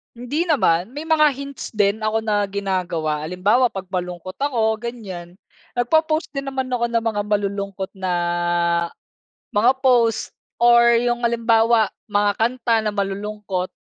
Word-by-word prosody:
Hindi 285 +9 -2
naman. 225 - +1
May 295 - -4
mga 320 -1 +4
hints 280 -3 -8
din 205 +1 +2
ako 220 +1 -1
na 205 -2 +1
ginagawa. 180 -6 -2
Halimbawa, 200 +9 +2
pag 195 -5 -6
malungkot 180 0 -5
ako 225 -6 0
ganyan, 195 -7 -7 0.4
nagpo-post 310 +6 +1
din 275 -1 -5
naman 265 -1 -3
ako 235 -1 +1
ng 230 -1 0
mga 220 -2 0
malulungkot 200 -2 -2
na, 185 -1 -1 1.4
mga 240 +6 +3
post 240 -4 +2 0.2
or 235 0 +5
'yung 240 0 0
halimbawa 230 -2 +3 0.2
mga 205 0 +2
kanta 235 0 +1
na 215 - -1
malulungkot. 200 -2 -3
220 Hz, 135 wpm, -21 LUFS, 200-245 Hz, 1.4 s, or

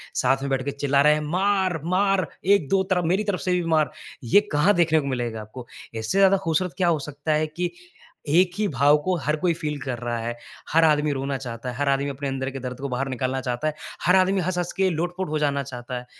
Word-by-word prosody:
साथ 135 +1 +2
में 140 - -3
बैठ 135 -1 0
के 140 - -1
चिल्ला 140 0 +1
रहे 150 +1 +6
हैं, 150 - -1
"मार! 190 -3 +1
मार! 190 +1 +2 0.2
1-2 195 -1 +3
तरफ 180 -1 +1
मेरी 210 +3 +1
तरफ 200 -3 -1
से 185 - -2
भी - - -2
मार।" 155 -1 +2 0.3
ये 200 - +5
कहाँ 165 +8 +4
देखने 160 -2 +3
को 140 - -4
मिलेगा 120 -4 -3
आपको? 120 +3 -10 0.3
इससे 110 - -2
ज़्यादा 195 0 +5
ख़ूबसूरत 165 +2 0
क्या 180 -2 +2
हो 160 -3 +2
सकता 145 +2 -2
है 155 +1 +1
कि 175 +3 -3 0.6
एक 175 +3 +4
ही 210 -1 +1
भाव 145 +1 +4
को 185 -1 +1
हर 150 +1 +2
कोई 180 -2 +2
फ़ील 150 -2 -4
कर 130 -3 -3
रहा 120 -1 -3
है। 120 +1 -3 0.4
हर 165 +1 +4
आदमी 150 -1 +3
रोना 135 0 -2
चाहता 125 -1 -6
है, 125 - -6
हर 145 -1 0
आदमी 140 +1 +1
अपने 140 +1 -4
अंदर 135 0 -2
के 135 - -6
दर्द 125 0 -6
को 140 - -3
बाहर 130 +2 -2
निकालना 130 +1 -2
चाहता 125 +3 -2
है, 155 - -1 0.3
हर 180 +2 +5
आदमी 190 +1 +3
हँस-हँस 175 0 -2
के 190 -1 +3
लोट-पोट 175 +2 -3
हो 155 0 -1
जाना 140 -2 0
चाहता 125 -1 -6
है। 125 - -12
150 Hz, 240 wpm, -24 LUFS, 135-180 Hz, 0.6 s, रहे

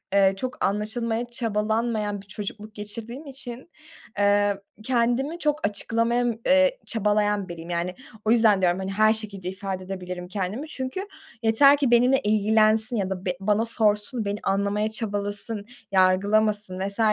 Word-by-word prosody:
ııı, 195 -1 +4
çok 255 +6 -3
anlaşılmaya 225 +3 -1
çabalanmayan 220 -2 -1
bir 195 - -20
çocukluk 210 +1 -7
geçirdiğim 230 +7 -8
için, 265 +2 -8 0.5
eee, 205 0 +2 0.2
kendimi 255 +6 0
çok 300 -4 0
açıklamaya, 230 +4 0
ııı, 235 -2 -1 0.5
çabalayan 210 -2 0
biriyim. 170 0 -8
Yani, 175 +1 -2 0.3
o 215 - +3
yüzden, 220 -4 +4
diyorum, 180 0 +2
hani, 190 0 -4
her 215 +2 +4
şekilde 200 -4 -3
ifade 190 0 -5
edebilirim 180 -1 -6
kendimi, 200 - -4
çünkü 305 +7 -5 0.4
yeter 275 +6 +6
ki 275 -4 +1
benimle 250 +3 +5
ilgilensin, 215 +2 +3
ya 195 -4 -1
da 190 -1 -5
be 180 - +1
bana 210 +3 +1
sorsun, 220 +1 +1
beni 200 +1 -2
anlamaya 200 +2 0
çabalasın, 205 -1 0 0.3
yargılamasın 200 +1 +2
vs. 200 +3 -2
210 Hz, 140 wpm, -25 LUFS, 200-235 Hz, 0.5 s, yeter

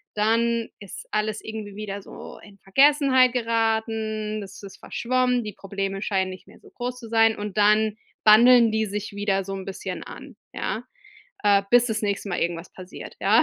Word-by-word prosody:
dann 230 +2 +1
ist 200 -3 -10
alles 215 0 -1
irgendwie 215 -2 -7
wieder 205 -1 -5
so - - -11
in 205 -2 -16
Vergessenheit 265 +3 +4
geraten, 220 -2 -1
es 195 0 -11
ist 195 - -10
verschwommen. 250 0 0
Die 210 -1 -6
Probleme 195 0 -4
scheinen 190 -3 0
nicht 185 - -12
mehr - - -17
so - - -18
groß 250 0 -5
zu 230 -2 -10
sein, 225 -1 +4
und 210 -1 -6
dann 210 +1 +3 0.3
bandeln 235 +2 +7
die 220 0 0
sich 205 +1 -5
wieder 200 -1 0
so 195 - -5
'n 190 -1 -7
bisschen 195 - -6
an, - - -11 0.2
ja? 225 - -3 0.6
Äh, 200 -1 +5
bis 245 0 +5
das 220 -2 -2
nächste 200 0 -2
Mal 175 - -2
irgendwas 170 0 -3
passiert, 185 0 -10
ja? - - +5
215 Hz, 180 wpm, -24 LUFS, 200-230 Hz, 0.6 s, bandeln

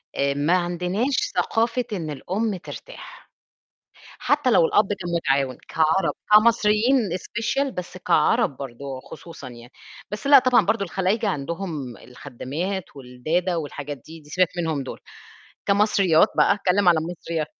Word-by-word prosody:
آآ 140 0 +1
ما 150 +6 +2
عندناش 180 +9 -1 0.2
ثقافة 235 +2 0
إن 165 -6 -4
الأم 195 +9 -2
ترتاح، - - -11 0.9
حتّى 290 -3 +1
لو 195 - +5
الأب 205 +4 +2
كان 190 -4 -4
مُتعاون 135 -5 0
كعرب، 160 +4 +2 0.2
كمصريين 220 +3 +5 0.2
special 235 +8 -2
بس 180 0 -7
كعرب 150 -5 +2
برضه 135 -1 -8
وخصوصًا 140 +2 -9
يعني، 120 +1 -13 0.4
بس 210 +5 -6
لأ 280 0 +9
طبعًا 250 -6 +3
برضه 220 -1 +1
الخلايجة 195 +4 0
عندهم 155 -5 -4
الخدّامات 145 +9 -5
والدادا 155 +8 -2
والحاجات 145 -2 -5
دي، 160 +1 -11
دي 150 -1 -18
سيبك 185 0 +2
منهم 160 -5 -1
دُول، 130 - -8 0.7
كمصريات 200 -3 +4
بقى - - +5
هاتكلّم 200 -1 +2
على 170 - +5
المصريا 165 -1 -4
175 Hz, 135 wpm, -23 LUFS, 145-210 Hz, 0.9 s, لأ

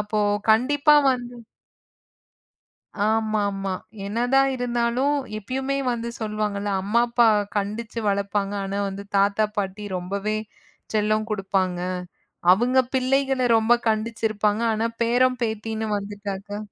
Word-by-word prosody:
அப்போ 210 0 -1 0.3
கண்டிப்பா 285 +6 +4 0.2
வந்து 245 -1 -5 1.7
ஆமாமா. 210 -3 0 0.3
என்னதான் 245 +6 +2
இருந்தாலும் 245 +3 0 0.2
இப்பயிமே 265 +6 -2
வந்து 235 0 -3
சொல்லுவாங்களா. 210 -2 -2
அம்மா 210 +5 +1
அப்பா 235 0 +4 0.3
கண்டிச்சு 215 +3 -3
வளர்ப்பாங்க. 200 0 -1
ஆனா 200 +1 -3
வந்து 195 +1 -7
தாத்தா 200 +2 +3
பாட்டி 200 +1 -3
ரொம்பவே 200 +4 -2 0.6
செல்லம் 215 0 +1
கொடுப்பாங்க. 190 -3 -1 0.7
அவங்க 245 +7 +3
பிள்ளைகள 265 0 +1 0.2
ரொம்ப 225 +2 +4
கண்டிச்சு 220 +1 -1
இருப்பாங்க. 210 +1 0
ஆனா 220 +1 0 0.2
பேரன் 250 +2 +2
பேத்தின்னு 220 0 -3
வந்துட்டாக்கா 205 0 -6
215 Hz, 105 wpm, -24 LUFS, 200-240 Hz, 1.7 s, கண்டிப்பா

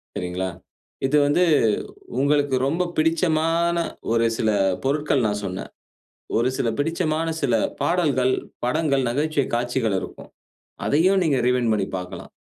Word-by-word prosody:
சரிங்களா? 90 +1 -3 0.6
இது 150 +3 +3
வந்து 145 +5 +3 0.8
உங்களுக்கு 145 -1 +2
ரொம்ப 165 +6 0
பிடிச்சமான, 165 +1 +2 0.3
ஒரு 115 0 +3
சில 110 - +2 0.3
பொருட்கள் 140 -2 +1
நான் 105 0 -1
சொன்னேன். 95 0 -5 0.7
ஒரு 120 +2 +2
சில 115 - 0
பிடிச்சமான 160 +1 0
சில 125 -5 +2 0.3
பாடல்கள், 140 -8 +2 0.3
படங்கள், 140 0 +1
நகைச்சுவை 145 +2 0
காட்சிகள் 120 -3 0
இருக்கும். - - -10 0.6
அதையும் 185 +6 +3
நீங்க 145 -5 +2
ரீவைன்ட் 125 -3 +2
பண்ணி 100 -2 0
பாக்கலாம். 90 +1 -8
140 Hz, 120 wpm, -23 LUFS, 120-160 Hz, 0.8 s, இது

